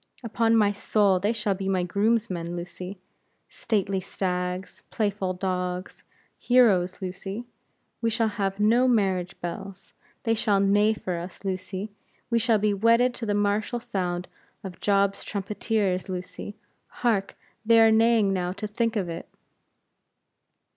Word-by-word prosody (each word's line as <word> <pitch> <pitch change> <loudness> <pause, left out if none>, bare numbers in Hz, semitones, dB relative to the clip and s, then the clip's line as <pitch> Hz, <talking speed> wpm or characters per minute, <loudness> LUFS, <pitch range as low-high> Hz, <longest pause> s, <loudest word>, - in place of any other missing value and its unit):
Upon 230 0 +2
my 210 -2 +4
soul, 200 -2 +2
they 205 +4 +1
shall 210 -3 0
be 195 0 -3
my 185 -2 +1
groomsmen, 200 -3 0
Lucy. 180 +2 -7 0.5
Stately 195 -3 -1
stags! 180 0 -3
playful 205 -4 -1
dogs! 180 0 -3 0.4
heroes, 200 -7 +3
Lucy. 195 +5 -5 0.6
We 230 - +2
shall 225 0 +1
have 195 -1 -2
no 235 +5 +4
marriage 195 -6 +1
bells; 185 +2 -7 0.3
they 225 - +2
shall 215 -3 +2
neigh 205 +2 +3
for 180 -4 -4
us, 175 +3 -9
Lucy; 190 +2 -4 0.4
we 235 - +3
shall 230 -1 +3
be 210 0 +1
wedded 230 +4 +3
to 235 -2 -5
the 205 - +1
martial 205 +3 0
sound 185 -6 -3 0.4
of 185 -3 -8
Job's 200 -1 +2
trumpeters, 200 -1 -1
Lucy. 185 +2 -6 0.3
Hark! 215 -5 -1 0.3
they 230 +1 +5
are 225 0 +7
neighing 220 -3 +4
now 180 -1 -1
to 210 - -6
think 230 +2 -1
of 195 -4 -1
it." 165 0 -6
200 Hz, 140 wpm, -26 LUFS, 185-220 Hz, 0.6 s, are